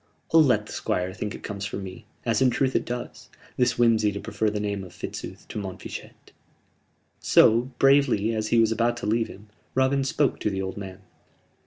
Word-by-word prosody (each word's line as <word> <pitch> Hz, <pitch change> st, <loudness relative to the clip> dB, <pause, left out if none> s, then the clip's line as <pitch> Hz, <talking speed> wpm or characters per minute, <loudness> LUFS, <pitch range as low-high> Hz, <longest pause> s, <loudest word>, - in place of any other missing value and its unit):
I'll 165 Hz, -, +8 dB
let 135 Hz, -5 st, +3 dB
the -, -, -11 dB
Squire 90 Hz, +1 st, -2 dB
think 105 Hz, +2 st, -4 dB
it -, -, -11 dB
comes 100 Hz, -1 st, -5 dB
from 100 Hz, -1 st, -4 dB
me 95 Hz, +4 st, -9 dB, 0.2 s
as 115 Hz, +2 st, +1 dB
in 130 Hz, -, +5 dB
truth 130 Hz, +2 st, 0 dB
it -, -, +1 dB
does 120 Hz, 0 st, -6 dB, 0.3 s
this 125 Hz, -1 st, +2 dB
whimsey 115 Hz, -3 st, +4 dB
to 100 Hz, -, -4 dB
prefer 110 Hz, 0 st, -1 dB
the 105 Hz, 0 st, -3 dB
name 100 Hz, -1 st, -2 dB
of 90 Hz, -, -11 dB
Fitzooth -, -, -7 dB
to -, -, -4 dB
Montfichet!" 95 Hz, -2 st, -8 dB, 0.9 s
So 120 Hz, +3 st, +5 dB
bravely, 135 Hz, -6 st, +4 dB
as 110 Hz, -1 st, -1 dB
he 115 Hz, -, +2 dB
was 115 Hz, -1 st, +4 dB
about 120 Hz, +1 st, +1 dB
to -, -, -5 dB
leave 115 Hz, +2 st, +1 dB
him, 105 Hz, +2 st, -13 dB, 0.3 s
Robin 130 Hz, +1 st, +2 dB
spoke 135 Hz, +1 st, +1 dB
to -, -, 0 dB
the 95 Hz, -1 st, -3 dB
old 95 Hz, 0 st, -4 dB
man. 95 Hz, -1 st, -8 dB
110 Hz, 200 wpm, -25 LUFS, 100-125 Hz, 0.9 s, I'll